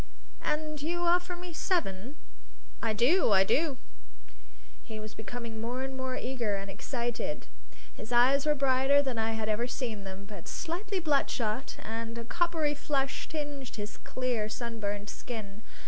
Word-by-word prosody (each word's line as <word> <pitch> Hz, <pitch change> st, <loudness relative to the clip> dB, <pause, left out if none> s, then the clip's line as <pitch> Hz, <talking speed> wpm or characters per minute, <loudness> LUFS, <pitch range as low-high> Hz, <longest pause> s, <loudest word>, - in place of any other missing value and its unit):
"And 305 Hz, -1 st, -1 dB
you 345 Hz, +4 st, 0 dB
offer 355 Hz, +1 st, +3 dB
me 350 Hz, 0 st, -7 dB
seven?" 280 Hz, -, 0 dB, 0.7 s
"I 225 Hz, -, +2 dB
do! 245 Hz, -, +5 dB
I 190 Hz, -1 st, +8 dB
do!" 290 Hz, +6 st, +2 dB, 1.1 s
He 220 Hz, -1 st, -6 dB
was 215 Hz, 0 st, -6 dB
becoming 225 Hz, 0 st, -5 dB
more 245 Hz, +3 st, -1 dB
and 265 Hz, 0 st, -3 dB
more 260 Hz, -1 st, -2 dB
eager 240 Hz, -5 st, 0 dB
and 195 Hz, 0 st, -4 dB
excited. 240 Hz, +2 st, -2 dB, 0.5 s
His 220 Hz, -, -8 dB
eyes 265 Hz, +4 st, +5 dB
were 300 Hz, -, +5 dB
brighter 270 Hz, +1 st, +5 dB
than 255 Hz, -4 st, -1 dB
I 225 Hz, 0 st, +1 dB
had 220 Hz, -1 st, -1 dB
ever 215 Hz, +3 st, +1 dB
seen 230 Hz, -6 st, -3 dB
them, 195 Hz, 0 st, -7 dB
but 200 Hz, -4 st, -9 dB
slightly 370 Hz, +3 st, -2 dB
bloodshot, 275 Hz, -6 st, +1 dB
and 230 Hz, +1 st, -4 dB
a 235 Hz, -, -3 dB
coppery 330 Hz, +1 st, +2 dB
flush 275 Hz, -2 st, -1 dB
tinged 290 Hz, -4 st, -4 dB
his 210 Hz, -1 st, -5 dB
clear, 245 Hz, -4 st, -1 dB
sunburnt 210 Hz, -3 st, -3 dB
skin. 215 Hz, -4 st, -6 dB
250 Hz, 150 wpm, -31 LUFS, 220-295 Hz, 1.1 s, I